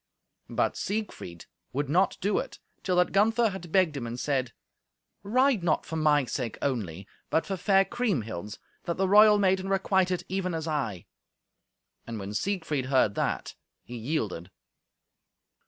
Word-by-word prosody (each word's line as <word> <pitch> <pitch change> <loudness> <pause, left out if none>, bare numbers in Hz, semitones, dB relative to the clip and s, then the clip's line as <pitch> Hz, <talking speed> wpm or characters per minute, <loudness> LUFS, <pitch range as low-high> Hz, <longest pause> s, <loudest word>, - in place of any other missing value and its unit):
But - - 0
Siegfried 200 - -4 0.3
would 145 +2 -1
not 180 +7 +2
do 200 +2 +1
it - - -6 0.2
till 185 - 0
that 180 0 +3
Gunther 220 +3 +3
had 175 -4 -8
begged 180 -5 +3
him 120 -4 -4
and 120 +1 -5
said, 130 -4 -1 0.7
"Ride 255 +2 +2
not 160 -3 +1
for 160 - -5
my 150 -3 +3
sake 120 -2 -4
only, 100 - -3 0.2
but 160 - +1
for 195 - -2
fair 195 +1 +3
Kriemhild's, 115 - -2 0.3
that 170 - -2
the 190 0 +1
royal 210 +2 +7
maiden 190 -1 +1
requite 190 -1 +2
it, 180 -1 -1
even 185 -2 -2
as 160 0 -4
I." 130 - -2 1.0
And 115 -1 -5
when 100 0 -6
Siegfried 155 - -1
heard 130 -6 +3
that, - - -2 0.3
he 120 - -9
yielded. 110 - -3
160 Hz, 155 wpm, -28 LUFS, 125-195 Hz, 1.0 s, royal